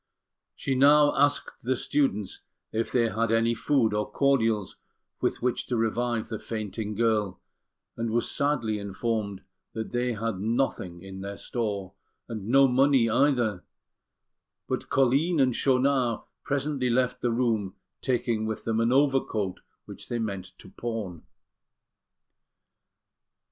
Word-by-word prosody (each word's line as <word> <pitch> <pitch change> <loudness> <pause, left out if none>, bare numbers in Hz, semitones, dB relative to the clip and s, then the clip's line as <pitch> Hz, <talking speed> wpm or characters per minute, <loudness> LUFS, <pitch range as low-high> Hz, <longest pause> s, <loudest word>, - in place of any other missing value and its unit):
She 135 - -2
now 145 +2 +5
asked 145 +1 +1
the 130 +2 0
students 115 -8 -1 0.3
if 115 +1 -2
they 115 -2 +2
had 115 +1 0
any 115 +1 +3
food 115 -1 +1
or 105 0 -1
cordials 115 -5 +1 0.4
with - - -1
which 125 -1 0
to 125 - -1
revive 115 +1 0
the 110 - -4
fainting 105 -1 -4
girl, 110 -3 +1 0.6
and 115 0 -2
was 115 +2 0
sadly 120 -7 0
informed 100 0 -3 0.3
that 110 -1 -5
they 125 0 0
had 115 -3 -3
nothing 105 -6 -1
in 95 0 -8
their 100 0 -6
store, 100 -5 -3 0.3
and 110 -4 -6
no 135 +3 +6
money 130 -2 +4
either; 120 -7 +2 1.0
but - - -3
Colline 140 +6 +3
and 130 -3 +3
Schaunard 130 -3 +2 0.2
presently 140 -2 -1
left 125 +1 +1
the 120 - +1
room, 115 -5 0 0.3
taking 120 -4 0
with 110 - -4
them 115 -1 0
an 115 +1 +2
overcoat 130 -8 +1 0.3
which - - -11
they 120 - -1
meant 100 -5 -4
to - - -14
pawn. 110 -8 -5
115 Hz, 135 wpm, -27 LUFS, 105-130 Hz, 1.0 s, no